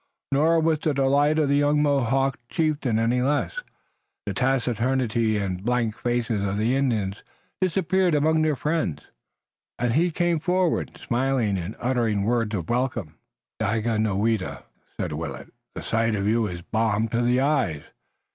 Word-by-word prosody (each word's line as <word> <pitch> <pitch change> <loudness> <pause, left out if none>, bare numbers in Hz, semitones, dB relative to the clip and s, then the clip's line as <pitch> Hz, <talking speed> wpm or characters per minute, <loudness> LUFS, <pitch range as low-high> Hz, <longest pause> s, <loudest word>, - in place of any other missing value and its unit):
Nor 160 +4 +3
was 160 -1 +2
the 155 -3 -1
delight 140 +3 +3
of 155 -2 +2
the 140 +1 +2
young 145 +1 +3
Mohawk 135 -1 +1
chieftain 150 -8 0
any 115 +2 +1
less 145 - 0 0.7
the - - -3
taciturnity 120 -3 +1
and 95 -2 -3
blank 115 -2 0
faces 120 -3 -1
of 100 0 -1
Indians 110 -4 0 0.4
disappeared 185 -1 +2
among 155 +2 +2
their 155 -1 +2
friends 150 - -2 0.7
and 120 -1 0
he 170 +6 +3
came 175 0 0
forward, 180 +1 0
smiling 125 -4 0
and 90 +3 -4
uttering 115 -5 0
words 115 -1 0
of 85 -4 -4
welcome. 120 - -2 0.4
"Daganoweda," 110 -1 0 0.3
said - - -3
Willet, 75 -2 -6 0.2
"the - - -6
sight 115 -1 +1
of 100 0 -1
you 110 0 +2
is 85 -2 -7
balm 110 +1 0
to 120 +2 0
the 120 +1 +2
eyes. 135 - 0
120 Hz, 145 wpm, -24 LUFS, 110-145 Hz, 0.7 s, Nor